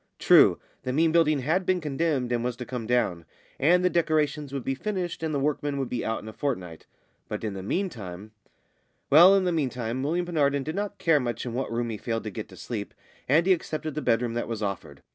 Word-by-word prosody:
True, - - +6 0.2
the 130 - -3
mean 160 +4 +3
building 155 -4 +3
had 160 +8 +1
been 185 0 +1
condemned 150 -4 -1
and 120 -1 0
was 125 -1 -2
to 125 0 -7
come 125 -3 -5
down; 105 -9 +1 0.4
and 180 +6 +4
the - - +5
decorations 155 -3 0
would 140 -2 -4
be 135 - -1
finished 180 +2 -3
and 160 -1 -2
the 145 - 0
workmen 145 0 -1
would 135 -2 -2
be 120 - -2
out 110 -1 -2
in - - -10
a 110 - -7
fortnight; 95 - -4 0.4
but - - -4
in 110 -2 -2
the 95 - -6
meantime 105 - -4 0.8
Well, 175 +7 +9
in 195 - +3
the 180 - +1
meantime, 125 -6 -2
William 170 +6 0
Penarden 140 -5 +1
did 155 - -4
not 205 +2 -3
care 165 -3 +3
much 120 -3 -3
in 120 - -4
what 130 +1 -3
room 120 0 -1
he 110 - -4
failed 115 0 -3
to 110 - -5
get - - -7
to - - -13
sleep, - - -6 0.3
and 160 +5 +4
he 190 - +6
accepted 155 -2 -4
the 150 - -3
bedroom 115 -2 +1
that 120 - -2
was 115 -2 -4
offered. 95 -8 -5
135 Hz, 230 wpm, -26 LUFS, 115-160 Hz, 0.8 s, Well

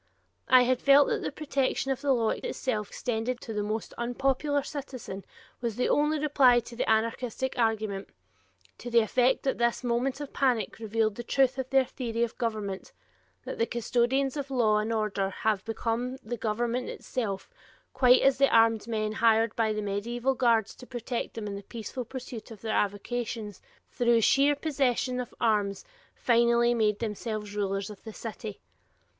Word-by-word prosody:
I 255 -1 +7
had 255 0 +1
felt 280 +1 +6
that - - 0
the - - -3
protection 275 -2 -1
of 265 0 -2
the 285 -2 +1
law 230 -4 +2
itself 215 -6 -3
extended 240 +1 -2
to 225 - -6
the 210 - -1
most 215 +1 -3
unpopular 270 +4 0
citizen 255 -10 -7 0.4
was 235 -3 -2
the 250 - 0
only 300 +1 +2
reply 275 -5 +4
to 235 0 -10
the 240 - -1
anarchistic 230 +3 0
argument, 215 -4 0 0.7
to 245 - -6
the 235 -1 +5
effect 250 +4 +2
that 265 -3 -1
this 235 +1 +1
moment 250 +3 0
of 290 -2 -7
panic 250 -5 0
revealed 220 -1 0
the 240 - -7
truth 265 +1 +2
of 260 -1 -3
their 270 -1 +4
theory 235 -2 -3
of 235 - -2
government; 215 -5 -3 0.5
that - - -6
the 230 - +2
custodians 245 +3 0
of 280 -2 -4
law 225 -5 +3
and 215 +2 -2
order 210 -3 0
have 205 0 -1
become 230 +3 -2
the 240 +2 -4
government 235 +3 -2
itself 200 -6 -4 0.5
quite 250 -1 +5
as 270 -1 +4
the 275 - +5
armed 225 -1 +4
men 215 -2 -1
hired 225 0 +3
by 225 -2 +1
the 215 0 -2
medieval 235 +6 -1
guilds 230 -4 +2
to 250 - -13
protect 240 0 -4
them 225 -2 -5
in 205 - -4
the 200 - -6
peaceful 235 +4 -6
pursuit 250 -2 -8
of 225 -3 -11
their 220 -1 -2
avocations, 210 +1 -2 0.3
through 235 -1 +3
sheer 275 +6 +4
possession 260 -4 0
of 250 - -5
arms 205 -3 +1 0.3
finally 235 0 +3
made 215 -3 +2
themselves 210 -1 -4
rulers 195 0 -2
of 205 - -13
the 220 - -8
city. 215 -2 -7
235 Hz, 175 wpm, -28 LUFS, 215-255 Hz, 0.7 s, I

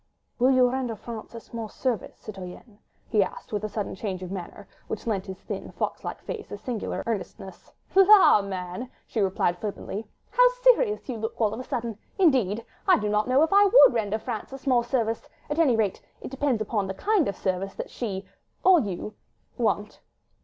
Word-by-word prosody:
"Will 250 +2 +5
you 255 -1 +5
render 250 -2 -2
France 230 +2 -8
a - - -5
small 225 -1 -7
service, 250 -1 -2
citoyenne?" 200 +2 -10 0.3
he 215 -3 +3
asked, 190 - -4
with 210 0 -1
a 215 - -2
sudden 210 -1 -3
change 190 -1 -4
of 180 - -7
manner, 195 +1 -7 0.2
which 220 - -5
lent 205 -4 -1
his 190 -1 -6
thin, - - -6
fox - - -3
like - - -5
face 445 -4 -6
singular 230 0 -4
earnestness. 200 -3 -6 0.2
"La, 390 - +7
man!" 190 +4 -5 0.2
she 225 - -2
replied 185 -2 +1
flippantly, 210 0 -5 0.3
"how - - +6 0.2
serious - - +4
you 250 -4 -3
look 220 +1 -5
all 215 -2 +2
of 225 - -5
a - - -5
sudden.... 230 -4 -4 0.2
Indeed 240 - +3 0.2
I - - +7
do 210 0 -2
not 210 +1 +1
know 260 +4 +4
if 325 - +1
I 405 +1 +7
would 405 - +7
render 220 -2 0
France 225 +1 -5
a 270 - -6
small 260 -3 +2
service—at 240 +5 -3
any 280 -8 +4
rate, 215 -4 0 0.2
it - - -8
depends 270 -5 0
upon 205 -2 -1
the 190 - -4
kind 405 - +2
of 200 - -2
service 190 0 -2
she—or 235 - 0
you—want." 210 - -4
225 Hz, 180 wpm, -26 LUFS, 200-260 Hz, 0.3 s, La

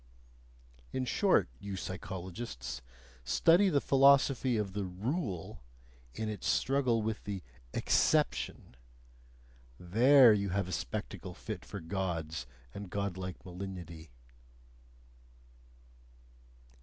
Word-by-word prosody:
In 130 - -2
short, - - +3
you 100 -1 -5
psychologists, 90 - -6 0.4
study 165 - +4
the 145 - +3
philosophy 135 -3 +4
of 100 -3 -2
the 100 0 -2
"rule" 95 - -4 0.5
in 110 - -3
its 105 -1 -4
struggle 130 -5 +2
with 110 0 -3
the 100 -3 -4 0.3
"exception": - - +1 1.1
there 120 +7 +6
you 100 -1 0
have 95 0 -1
a - - -6
spectacle 95 -1 -5
fit 105 -3 -6
for 100 - -7
Gods 80 -6 -3 0.3
and 100 -2 -7
godlike 95 -2 -4
malignity! 90 -3 -8
100 Hz, 95 wpm, -32 LUFS, 90-115 Hz, 1.1 s, there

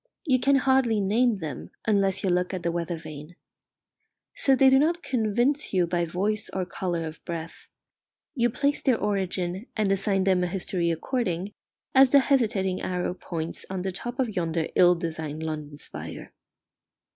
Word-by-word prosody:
You 260 -5 +3
can 275 +3 +3
hardly 260 -4 +3
name 220 +3 +2
them 155 -8 -6 0.2
unless 195 -3 +2
you 190 - +1
look 180 +1 0
at 180 - -5
the 170 - 0
weather 170 0 -3
vane. 155 +1 -10 1.0
So 270 - +4
they 270 0 +5
do 265 0 +6
not 335 +4 +1
convince 250 +2 +1
you 180 -2 +3
by 175 0 0
voice 200 +6 -1
or 185 -1 -2
colour 175 -1 -3
of 160 0 -8
breath; 165 -1 -7 0.7
you 240 -2 +2
place 280 +5 0
their 255 -5 +3
origin 190 -1 -2
and 210 -2 +1
assign 195 0 +1
them 185 -1 +2
a - - +1
history 175 -1 -1
according 185 - -2 0.4
as 265 0 +7
the 280 - +6
hesitating 220 -9 +1
arrow 180 -1 -2
points 165 -2 -4
on 190 -1 -3
the 190 - -2
top 240 +7 -6
of 235 -5 0
yonder 165 -2 -1
ill 180 0 +6
designed 160 -2 -5
London 150 -2 -5
spire. - - -7
190 Hz, 170 wpm, -26 LUFS, 170-240 Hz, 1.0 s, as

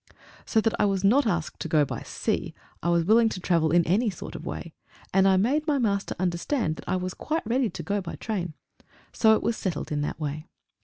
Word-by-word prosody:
So 220 - +3
that 225 0 +1
I 210 - +4
was 195 -2 0
not 240 +7 +4
asked 170 -6 -2
to - - -3
go 150 -2 +3
by - - -5
Sea, - - -3 0.3
I 170 - 0
was 170 -1 +2
willing 225 +3 +5
to 190 - -5
travel 170 -3 +2
in 170 +1 +4
any 215 +7 +2
sort 195 - -8
of - - -7
way - - -6 0.4
and 195 0 +5
I 190 -1 +5
made 280 - +1
my 295 -2 +2
Master 200 -6 0
understand 175 - -1
that - - -9
I - - +2
was 185 0 -3
quite 315 -2 -3
ready 240 +1 +1
to - - -7
go 205 0 -1
by 175 - -6
train, 180 -8 -4 0.6
so 220 -1 +5
it - - -2
was 235 - +1
settled 170 -9 -3
in 145 -1 0
that 145 - -3
way. 155 0 -4
195 Hz, 235 wpm, -26 LUFS, 170-225 Hz, 0.6 s, willing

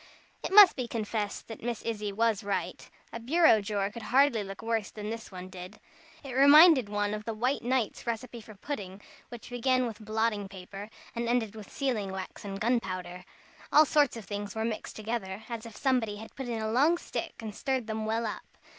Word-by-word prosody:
It - - -3
must 400 -2 +9
be 250 -2 -3
confessed 215 -2 -3
that 225 - -9
Miss 235 -1 -3
Izzie 210 -3 -3
was 220 0 +1
right. 190 -3 -3 0.2
A 230 - -4
bureau 270 -2 +4
drawer 200 -1 -1
could 235 - -8
hardly 250 -1 +3
look 195 0 -8
worse 225 -2 -1
than 210 0 -6
this 225 -2 -7
one 185 -1 -8
did. 185 +2 -10 0.4
It 270 -3 -7
reminded 285 - +7
one 205 0 -1
of 215 0 -4
the 225 0 -4
White 250 +5 0
Knight's 245 -1 -1
recipe 235 +1 -4
for 215 0 -12
a - - -21
pudding, 200 -6 -6 0.3
which 240 0 -10
began 255 +1 +2
with 225 -2 -6
blotting 215 -1 0
paper, 195 +2 -9 0.3
and 235 0 -2
ended 235 -4 +1
with 215 -2 -10
sealing 230 -8 -1
wax 190 -1 -7
and 195 -1 -5
gunpowder. 185 -6 -1 0.5
All 305 +1 +7
sorts 290 -4 +2
of 220 - -8
things 205 0 -5
were 220 0 -1
mixed 225 -2 -4
together, 215 -2 -4
as 230 -1 -6
if 225 - -12
somebody 250 -6 +1
had 220 +1 -10
put 265 -2 -5
in 230 -1 -2
a 220 - -1
long 295 +9 +4
stick - - -5
and 220 -2 -6
stirred 260 +2 -1
them 220 0 -3
well 225 +1 0
up. 215 - -4
220 Hz, 205 wpm, -29 LUFS, 205-245 Hz, 0.5 s, must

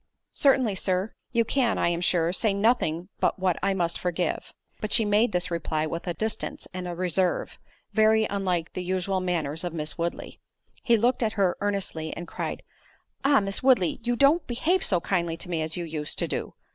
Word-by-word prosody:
"Certainly, 265 -6 +3
Sir. 190 +2 -1 0.2
You 235 -2 +2
can, 245 -2 +1
I - - +2
am 170 0 -1
sure, 175 -1 +2
say 205 +1 +1
nothing 200 -5 +1
but - - +1
what 185 -2 0
I 195 0 +1
must 170 -2 -1
forgive." 175 -1 -2 0.3
But 215 - -4
she 225 -2 +4
made 210 +3 +3
this 180 0 0
reply 160 -2 -1
with 165 +3 -5
a 175 - -2
distance 220 +6 -3
and 180 -1 -5
a 175 - -4
reserve, 180 0 0 0.3
very 220 0 +4
unlike 185 -5 -1
the 185 - -4
usual 185 +1 -1
manners 165 -4 -2
of 175 -2 -3
Miss 150 -1 -3
Woodley. 170 +1 -4 0.4
He 235 -1 +4
looked 245 +4 +2
at 220 -2 +1
her 195 -4 +2
earnestly 195 -6 -2
and 175 - -6
cried, - - -4 0.6
"Ah! 280 +1 +5
Miss 195 0 -1
Woodley, 250 -10 +3
you 240 +1 0
don't 280 +7 +4
behave 330 +10 +1
so 180 - +3
kindly 170 -3 -1
to 170 - -7
me 165 -2 0
as 160 +2 -2
you 175 - -2
used 155 -2 -2
to - - 0
do!" - - -4
185 Hz, 195 wpm, -26 LUFS, 170-220 Hz, 0.6 s, Ah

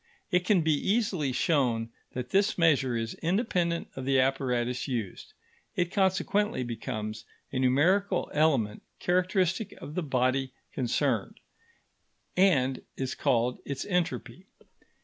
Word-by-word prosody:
It 180 -1 +2
can 190 -3 +4
be 160 0 +3
easily 190 - 0
shown 125 -5 +1 0.2
that 125 0 -5
this 200 +2 +2
measure 145 -7 +3
is 115 0 -3
independent 175 -2 0
of 130 - -5
the 135 0 +3
apparatus 125 -2 0
used. 115 -8 -4 0.4
It 175 -1 0
consequently 195 - +1
becomes 110 -2 -5 0.3
a 130 - -1
numerical 175 +10 +2
element 135 -9 +2 0.2
characteristic 185 +2 +1
of 145 - -9
the 180 - -1
body 130 -2 0 0.2
considered, 125 -4 0 1.0
and 135 -9 +3 0.2
is 130 -1 -2
called 125 -3 +1
its 140 -2 -4
entropy. 180 0 -2
145 Hz, 120 wpm, -29 LUFS, 125-180 Hz, 1.0 s, can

